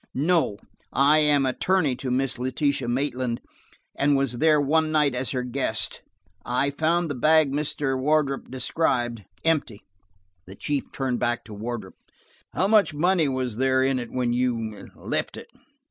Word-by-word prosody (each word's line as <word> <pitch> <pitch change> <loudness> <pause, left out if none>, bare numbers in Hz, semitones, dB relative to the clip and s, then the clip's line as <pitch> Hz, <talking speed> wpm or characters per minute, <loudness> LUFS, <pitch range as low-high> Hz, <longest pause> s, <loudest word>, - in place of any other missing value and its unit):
"No, 155 - +1 0.3
I 145 +3 +4
am 145 -2 +3
attorney 150 +2 +1
to 130 - -4
Miss 130 0 -1
Letitia 130 +1 -1
Maitland, 125 -1 -1 0.6
and 140 0 +2
was 130 -3 -1
there 155 0 +4
one 155 +2 +2
night 150 -3 +2
as 125 +1 -2
her 125 -2 -2
guest. 125 -1 -2 0.4
I 125 +3 0
found 165 +4 +1
the 145 - -3
bag 155 +3 +4
as - - -5 0.2
Mr. 135 -2 -1
Wardrop 145 0 0
described, 120 - -1 0.2
empty." 150 -10 0 0.6
The 95 - -10
chief 145 +6 -3
turned 130 -3 -2
back 120 0 -1
to 110 - -10
Wardrop. 105 -3 -5 0.6
"How 190 - +1
much 205 -7 +3
money 170 0 +2
was 130 -4 -3
there 130 0 +2
in 135 -1 +1
it 120 -2 -6
when 125 -2 0
you–left 115 -4 -3
it - - -11
135 Hz, 155 wpm, -25 LUFS, 125-150 Hz, 0.6 s, I